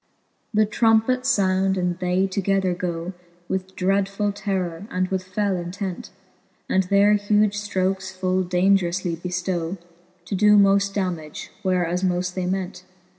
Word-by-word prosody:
XVII. -, -, -44 dB
The 215 Hz, 0 st, +5 dB
trompets 225 Hz, +4 st, +2 dB
found, 190 Hz, -1 st, +1 dB
and 180 Hz, -1 st, -1 dB
they 180 Hz, +1 st, +1 dB
together 195 Hz, -1 st, 0 dB
goe, 175 Hz, 0 st, -4 dB, 0.3 s
With 190 Hz, 0 st, -4 dB
dreadfuU 195 Hz, +2 st, 0 dB
terror, 190 Hz, -2 st, -3 dB
and 185 Hz, 0 st, -1 dB
with 190 Hz, -1 st, -1 dB
fell 195 Hz, +1 st, -1 dB
intent; 180 Hz, +1 st, -5 dB, 0.6 s
And 190 Hz, -, +2 dB
their 200 Hz, +2 st, +4 dB
huge 205 Hz, 0 st, +2 dB
flrokes 190 Hz, -2 st, -1 dB
full 185 Hz, 0 st, 0 dB
daungeroufly 180 Hz, -1 st, +1 dB
beftow, 180 Hz, 0 st, -3 dB, 0.5 s
To 195 Hz, -, -3 dB
doe 210 Hz, +2 st, +5 dB
moft 200 Hz, 0 st, +4 dB
dammage, 175 Hz, -6 st, -3 dB
where 185 Hz, -3 st, +1 dB
as 175 Hz, +2 st, -2 dB
moft 180 Hz, -1 st, 0 dB
they 185 Hz, -1 st, -2 dB
ment. 185 Hz, -1 st, -3 dB
190 Hz, 140 wpm, -23 LUFS, 180-200 Hz, 0.6 s, The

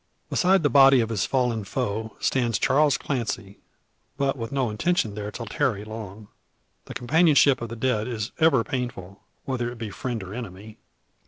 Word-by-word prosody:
Beside 190 Hz, -1 st, +3 dB
the 145 Hz, -, +3 dB
body 135 Hz, -2 st, +7 dB
of 115 Hz, -1 st, 0 dB
his 110 Hz, -4 st, -1 dB
fallen 125 Hz, -5 st, 0 dB
foe 110 Hz, +3 st, -3 dB
stands 120 Hz, -5 st, +1 dB
Charles 145 Hz, 0 st, +3 dB
Clancy, 115 Hz, -6 st, -4 dB, 0.6 s
but 140 Hz, -1 st, 0 dB
with 115 Hz, -3 st, -6 dB
no 130 Hz, -5 st, 0 dB
intention 110 Hz, -, 0 dB
there 105 Hz, 0 st, -5 dB
to 115 Hz, +2 st, -7 dB
tarry 105 Hz, -1 st, -1 dB
long. 110 Hz, -1 st, -8 dB, 0.6 s
The -, -, -9 dB
companionship 145 Hz, 0 st, +4 dB
of 120 Hz, -, -4 dB
the 115 Hz, -, -6 dB
dead 110 Hz, -2 st, 0 dB
is 115 Hz, -2 st, -4 dB
ever 155 Hz, -7 st, +4 dB
painful, 115 Hz, -8 st, -5 dB, 0.2 s
whether 120 Hz, -3 st, -2 dB
it 120 Hz, -, -10 dB
be 110 Hz, -3 st, -6 dB
friend 120 Hz, 0 st, -4 dB
or 95 Hz, +1 st, -8 dB
enemy. 105 Hz, -2 st, -8 dB
115 Hz, 170 wpm, -25 LUFS, 105-135 Hz, 0.6 s, body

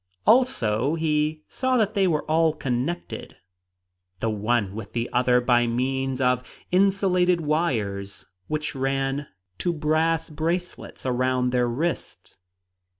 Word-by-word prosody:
Also, 145 Hz, -, +3 dB
he 155 Hz, -1 st, 0 dB
saw 260 Hz, -1 st, 0 dB
that 215 Hz, -2 st, +1 dB
they 195 Hz, -3 st, +3 dB
were 155 Hz, -4 st, +1 dB
all 160 Hz, 0 st, +2 dB
connected, 140 Hz, +4 st, -3 dB, 0.8 s
the 115 Hz, -, 0 dB
one 105 Hz, -1 st, 0 dB
with 110 Hz, -1 st, -8 dB
the 120 Hz, 0 st, -1 dB
other 125 Hz, 0 st, +4 dB
by 120 Hz, -1 st, +3 dB
means 130 Hz, +2 st, -1 dB
of 125 Hz, -1 st, +2 dB, 0.3 s
insulated 180 Hz, -2 st, +3 dB
wires 110 Hz, -, -1 dB, 0.2 s
which 155 Hz, 0 st, -2 dB
ran 135 Hz, +1 st, -1 dB, 0.3 s
to 175 Hz, -, 0 dB
brass 160 Hz, +1 st, +1 dB
bracelets 170 Hz, +2 st, -3 dB
around 125 Hz, 0 st, +1 dB
their 125 Hz, -1 st, +2 dB
wrists. 155 Hz, +8 st, -4 dB
145 Hz, 120 wpm, -25 LUFS, 125-165 Hz, 0.8 s, other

